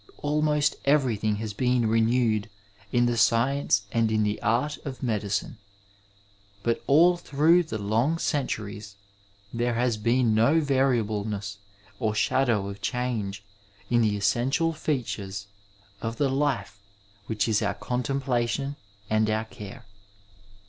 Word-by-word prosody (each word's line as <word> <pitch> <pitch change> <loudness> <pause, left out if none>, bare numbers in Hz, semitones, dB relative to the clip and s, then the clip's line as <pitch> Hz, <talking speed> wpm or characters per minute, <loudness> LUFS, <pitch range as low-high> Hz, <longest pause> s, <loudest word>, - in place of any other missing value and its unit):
Almost 150 0 +1
everything 120 -7 +2
has 105 0 -4
been 125 +1 +1
renewed 115 -1 +2 0.4
in 120 0 +3
the 120 -1 0
science 115 -2 +2
and 115 -1 +1
in 110 -1 +2
the 105 0 -1
art 125 +8 0
of 135 -2 -7
medicine, 105 -1 -2 1.0
but 115 0 0
all 170 +5 +5
through 165 +2 +3
the 155 -10 -4
long 115 +10 +1
centuries 105 - -3 0.6
there 120 0 0
has 120 -1 +1
been 115 +1 +2
no 115 +9 +4
variableness 110 -8 0 0.4
or 110 -1 0
shadow 120 -4 +1
of 100 0 -8
change 110 -5 -2 0.5
in 120 -1 +4
the 105 -2 +2
essential 125 +11 +1
features 105 -10 -3 0.6
of 115 0 -3
the 140 0 +1
life 130 -8 -1 0.5
which 110 -1 0
is 110 -1 +2
our 100 -2 -1
contemplation 130 +1 -1 0.3
and 110 0 +2
our 110 +1 0
care. 105 -4 -10
115 Hz, 125 wpm, -26 LUFS, 105-135 Hz, 1.0 s, all